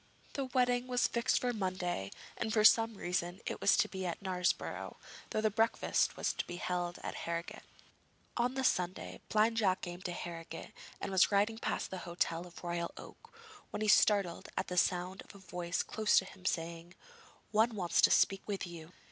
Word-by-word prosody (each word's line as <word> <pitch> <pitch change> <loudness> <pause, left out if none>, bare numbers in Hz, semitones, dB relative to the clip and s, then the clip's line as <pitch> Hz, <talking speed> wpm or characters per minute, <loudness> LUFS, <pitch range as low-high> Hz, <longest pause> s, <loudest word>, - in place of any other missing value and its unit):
The 275 - -2
wedding 250 -1 +1
was 250 -1 +2
fixed 235 +1 +1
for 245 -1 0
Monday, 185 - -2 0.3
and 220 - -2
for 215 0 +3
some 225 +1 +6
reason 175 0 -2
it - - -4
was - - +5
to - - +3
be 190 -1 -5
at 170 - -3
Knaresborough, 185 -2 -1 0.3
though 215 - 0
the 215 0 +2
breakfast 225 +2 +1
was - - 0
to - - -4
be 175 - -5
held 175 -1 -2
at - - -3 0.2
Harrogate. 170 0 -4 0.7
On 245 +2 +1
the 265 - -1
Sunday 175 - 0
Blind 220 +1 +3
Jack 195 -4 +2
came 175 0 -6
to 180 - -3
Harrogate 165 -2 -7 0.3
and - - -4
was 190 +1 +5
riding 210 +3 +2
past - - -2
the 190 - -4
hotel 175 0 -2
of 170 - -16
the 175 - -8
Royal 170 0 -2
Oak, - - -12 0.4
when - - -5
he - - +1
was 210 - +7
startled 200 -5 +3
at 190 - -1
the 180 - -3
sound 180 +2 +1
of - - -14
a - - -10
voice 180 -2 -3
close 215 -1 +2
to 190 - +4
him 185 -1 -14
saying: 170 +1 -3 0.6
'One 220 +2 +3
wants 180 -4 +2
to - - +7
speak 195 -1 +4
with 200 -2 -2
you.' 170 -1 -10
185 Hz, 200 wpm, -34 LUFS, 175-215 Hz, 0.7 s, was